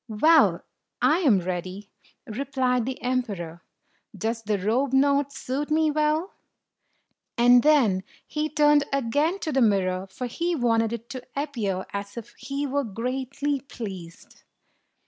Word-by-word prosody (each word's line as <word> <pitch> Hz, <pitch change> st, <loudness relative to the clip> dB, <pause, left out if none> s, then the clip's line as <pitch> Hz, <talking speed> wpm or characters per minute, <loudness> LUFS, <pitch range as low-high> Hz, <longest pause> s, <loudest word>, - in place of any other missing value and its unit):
"Well, 310 Hz, +9 st, +4 dB, 0.4 s
I 315 Hz, +3 st, +3 dB
am 245 Hz, -, +4 dB
ready*" 185 Hz, +3 st, -5 dB, 0.3 s
replied 250 Hz, 0 st, -1 dB
the 260 Hz, -, -4 dB
emperor. 205 Hz, -10 st, -3 dB, 0.6 s
"Does 225 Hz, +4 st, -2 dB
the 210 Hz, -1 st, -1 dB
robe 240 Hz, +8 st, 0 dB
not 280 Hz, +1 st, +3 dB
suit 280 Hz, +2 st, -4 dB
me 310 Hz, 0 st, +2 dB
well?" 305 Hz, +5 st, 0 dB, 1.0 s
And 245 Hz, +1 st, +6 dB
then 255 Hz, -11 st, +4 dB, 0.2 s
he 305 Hz, 0 st, -2 dB
turned 295 Hz, -1 st, +4 dB
again 285 Hz, +7 st, +1 dB
to 315 Hz, -, -2 dB
the 270 Hz, -1 st, +2 dB
mirror, 190 Hz, -4 st, +1 dB
for 220 Hz, +6 st, -6 dB
he 340 Hz, +8 st, -2 dB
wanted 230 Hz, -4 st, +1 dB
it 235 Hz, 0 st, -6 dB
to 255 Hz, -2 st, -6 dB
appear 230 Hz, -10 st, -2 dB
as 200 Hz, +2 st, -5 dB
if 235 Hz, 0 st, -8 dB
he 280 Hz, +1 st, -3 dB
were 285 Hz, +1 st, -1 dB
greatly 260 Hz, +5 st, -3 dB
pleased. 195 Hz, -10 st, -9 dB
250 Hz, 135 wpm, -25 LUFS, 210-285 Hz, 1.0 s, And